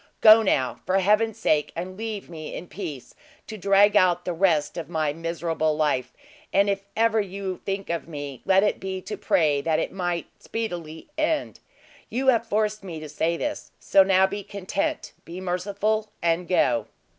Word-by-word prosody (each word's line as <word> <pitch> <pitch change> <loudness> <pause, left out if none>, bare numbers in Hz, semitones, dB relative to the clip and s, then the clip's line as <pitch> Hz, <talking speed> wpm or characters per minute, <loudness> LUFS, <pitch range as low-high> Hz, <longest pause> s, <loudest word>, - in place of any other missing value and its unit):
Go 220 +1 +9
now, 135 - 0
for 185 - +1
Heaven's 210 +3 +2
sake, 150 -8 +1
and 180 +2 -5
leave 215 -1 -5
me 160 -2 -7
in - - -6
peace, 170 -9 -7 0.3
to 220 - -7
drag 200 +1 +4
out 180 -3 +4
the 180 - -1
rest 165 -4 +2
of 165 -3 -6
my 155 -3 0
miserable 165 -1 -1
life; 145 -5 0 0.4
and 200 +1 +3
if 195 0 -2 0.2
ever 225 -1 +3
you 195 -1 -5
think 195 -2 -3
of 170 - -3
me, 145 -5 -7
let 190 +1 +4
it 210 - +1
be 190 0 -4
to - - -5
pray 150 -4 +2
that 160 +1 +1
it - - -2
might 175 -2 -2 0.2
speedily 175 - -5
end. 310 -1 0 0.5
You 265 +3 +1
have 230 -2 +2
forced 215 -1 0
me 170 -4 -6
to 155 - -7
say 165 +3 0
this: 295 - -4
so 195 - +5
now 190 0 +5
be 200 +1 -4
content. 195 0 -3
Be 170 +2 -8
merciful, 200 +4 -1
and 170 +1 0
go!" 120 -11 +2
185 Hz, 180 wpm, -25 LUFS, 165-205 Hz, 0.5 s, Go